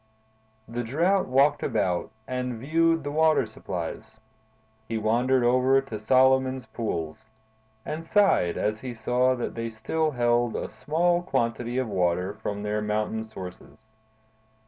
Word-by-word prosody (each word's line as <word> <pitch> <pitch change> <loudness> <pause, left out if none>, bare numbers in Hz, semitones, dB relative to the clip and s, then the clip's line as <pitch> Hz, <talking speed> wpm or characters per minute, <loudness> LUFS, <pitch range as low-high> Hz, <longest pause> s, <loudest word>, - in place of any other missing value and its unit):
The 120 +1 -3
Drought 170 +11 +1
walked 140 +3 +3
about 90 +1 0 0.2
and 125 -2 -3
viewed 165 +6 +2
the 145 - -4
water 155 -3 +3
supplies. 110 +1 -6 0.7
He 115 - -2
wandered 120 +4 +2
over 130 +2 +4
to 135 -6 -6
Solomon's 130 +2 +3
Pools, 110 -3 -4 0.6
and 155 +2 -4
sighed 165 - +3
as 110 +1 -1
he 125 0 -6
saw 125 +3 +1
that 120 - -4
they 115 0 -4
still 155 +8 -1
held 120 -3 +1
a - - -4
small 175 +3 +1
quantity 120 -6 -1
of 130 -2 0
water 90 -1 0
from 105 -1 -5
their 105 0 -1
mountain 105 +1 -1
sources. 95 -5 -10
120 Hz, 135 wpm, -26 LUFS, 110-135 Hz, 0.7 s, over